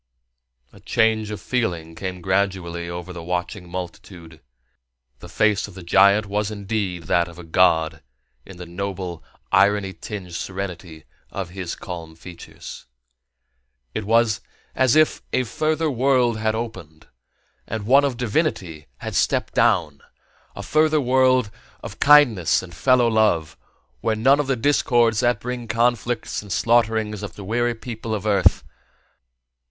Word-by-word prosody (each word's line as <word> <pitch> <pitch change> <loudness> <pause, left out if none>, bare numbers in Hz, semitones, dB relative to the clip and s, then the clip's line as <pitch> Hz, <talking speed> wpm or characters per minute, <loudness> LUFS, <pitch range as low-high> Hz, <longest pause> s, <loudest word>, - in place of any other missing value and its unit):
A - - -16
change 110 -1 +1
of 105 -1 -5
feeling 90 -9 -2
came 90 +2 -6
gradually 95 -3 -1
over 90 +1 -7
the 85 - -7
watching 90 +2 -4
multitude. 90 -3 -8 0.8
The - - -11
face 105 -1 +1
of 100 - -14
the 95 - -9
giant 100 +4 +4
was 105 +1 -2
indeed 100 -4 -3
that 85 +2 +1
of 85 0 -13
a 90 - -9
god 80 -2 +2 0.4
in 95 +4 -13
the 90 - -8
noble, 90 -1 -5 0.3
irony 100 -1 +3
tinged 90 0 -8
serenity 90 -4 -6 0.3
of 95 -3 -6
his 90 -2 -5
calm 85 -3 -8
features. 85 +1 -11 1.1
It 110 - -3
was 115 -1 +2 0.3
if 130 +4 +3
a 130 - +2
further 155 +4 -1
world 125 -3 +2
had 110 0 0
opened, 90 -9 -7 0.6
and 110 -2 -4
one 135 +5 +5
of 135 -4 -1
divinity 105 - -2
had - - -5
stepped - - 0
down; 90 -11 +2 0.5
a - - -7
further 155 0 +2
world 130 -3 +3 0.3
of - - -8
kindness 135 - +5
and 90 -2 -11
fellow 125 +7 +3
love, 110 -9 +1 0.4
where 110 - 0
were - - -7
none 135 +3 +5
of 145 - -1
the 135 - +1
discords 120 -3 +2
that 120 -3 +2
bring 125 +1 -5
conflicts 120 0 0
and 100 -2 -11
slaughterings 110 -2 +1
to 105 - -5
the 100 +2 -11
weary 120 +4 0
people 115 -1 -5
of 105 -1 -6
Earth. 100 -3 +3
105 Hz, 145 wpm, -22 LUFS, 90-120 Hz, 1.1 s, one